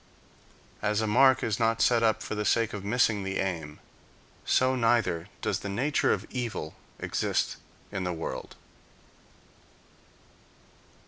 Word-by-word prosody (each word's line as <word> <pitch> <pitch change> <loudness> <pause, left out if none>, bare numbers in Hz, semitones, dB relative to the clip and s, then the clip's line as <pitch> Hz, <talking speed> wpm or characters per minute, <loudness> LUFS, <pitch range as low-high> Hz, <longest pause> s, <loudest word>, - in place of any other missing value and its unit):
As 105 0 +1
a 110 - +1
mark 130 +5 +5
is 110 -1 -1
not 115 0 +2
set 120 -2 +4
up 110 -1 +2
for - - -4
the 105 0 -2
sake 115 +2 +1
of 105 -2 -5
missing 110 -1 +2
the 95 0 -3
aim, 80 -6 -3 0.7
so 130 0 +2
neither 115 -9 +1 0.2
does - - 0
the 100 - -5
nature 135 +9 +1
of - - -1
evil 115 -11 -4 0.3
exist - - -1 0.3
in 100 -1 -3
the 90 - -1
world. 80 -1 -5
110 Hz, 135 wpm, -28 LUFS, 95-120 Hz, 0.7 s, mark